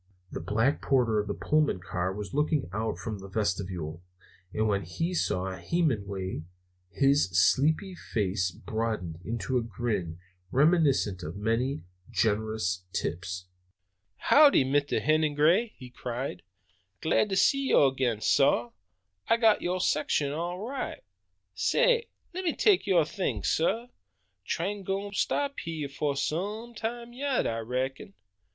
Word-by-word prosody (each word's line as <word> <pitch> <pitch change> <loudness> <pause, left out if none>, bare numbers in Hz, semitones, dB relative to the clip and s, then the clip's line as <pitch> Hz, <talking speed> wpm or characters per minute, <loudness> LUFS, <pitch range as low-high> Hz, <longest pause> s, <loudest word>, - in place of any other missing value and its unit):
The - - -4
black 115 +8 +1
porter 120 -5 +2
of 105 - -2
the 100 - -2
Pullman 150 -9 +1
car 90 +1 -2
was 100 +1 -6
looking 150 0 +1
out 110 +2 -2
from 110 -3 -5
the 95 - -9
vestibule, 90 -5 -2 0.5
and 110 +1 0
when 100 -2 +1
he 165 - -3
saw 95 - -1
Hemenway 100 - -1 0.5
his 140 -1 +3
sleepy 155 - +3
face 95 - -1
broadened 105 -4 -4
into 115 +4 -1
a - - -2
grin 105 -6 -3 0.3
reminiscent 140 - +3
of 80 -1 -6
many 115 +7 -1 0.3
generous 110 -3 0
tips. 90 +1 -3 0.7
"Howdy, 285 - +6
Mr. 145 +2 +1
Hennigray," 155 +8 +3
he 125 -2 -11
cried; 120 -6 -5 0.6
"glad 185 +6 +2
to 195 - 0
see 275 +7 +3
yo' 135 -2 +5
ag'in, 125 -5 -1
sah! 120 -3 +3 0.6
I 230 - +4
got 225 -2 +4
yo' 180 +1 -1
section 150 -4 +1
all 170 +4 -3
right, 270 +1 -5 0.5
sah! - - +3 0.3
Lemme 360 -2 -1
take 405 - +3
yo' 180 -4 +5
things, 150 - -2
sah! 225 +9 +1 0.6
Train 195 +4 -2
gwine 195 +2 -3
to - - -8
stop 280 +5 0
hy'eh 160 -3 -4
fo' 140 0 -1
some 205 - -3
time 235 +2 -5
yet, 275 +1 0
I 115 0 -1
reckon." 125 -2 -3
135 Hz, 135 wpm, -28 LUFS, -, 0.7 s, Howdy